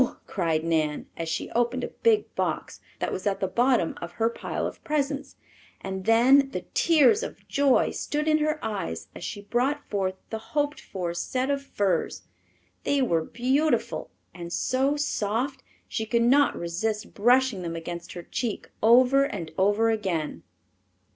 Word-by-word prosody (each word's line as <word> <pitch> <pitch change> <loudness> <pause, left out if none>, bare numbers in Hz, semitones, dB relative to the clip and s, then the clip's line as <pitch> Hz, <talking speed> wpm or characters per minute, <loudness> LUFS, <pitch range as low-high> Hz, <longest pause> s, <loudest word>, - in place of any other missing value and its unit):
cried 165 -4 0
Nan, 155 -3 0
as 165 -1 -4
she 165 - -3
opened 240 +2 0
a - - -3
big 445 -2 +3
box - - -2 0.2
that - - -2
was 185 - -3
at 195 - 0
the 190 - 0
bottom 240 -2 +2
of 170 - -6
her 225 0 +1
pile - - -4
of - - -6
presents, 285 -1 -2 0.4
and 190 -1 -5
then 260 +5 +5
the - - -5
tears 335 +6 +5
of - - -7
joy 280 -2 +3
stood 300 +1 -2
in 310 0 +4
her 305 0 +1
eyes 80 - -4
as - - -9
she 205 - -5
brought 260 +7 0
forth 190 -2 0 0.2
the 220 - -3 0.2
hoped 290 0 0
for 180 -3 -4
set 255 +10 -1
of 280 0 0
furs. 205 -8 -1 0.6
They 280 -2 +2
were 165 -9 +1
beautiful, 260 - 0 0.2
and 170 -1 -8
so 265 +9 +1
soft 260 -1 -1 0.3
she 220 -1 -3
could 235 +1 +2
not 275 +4 +4
resist 210 +6 -3
brushing 245 -1 +3
them 165 -1 -4
against 170 +1 -6
her 175 - -7
cheek 225 +5 -4
over 255 +5 +6
and 165 - -5
over 205 +5 +3
again. 185 -8 -2
230 Hz, 160 wpm, -26 LUFS, 185-275 Hz, 0.6 s, over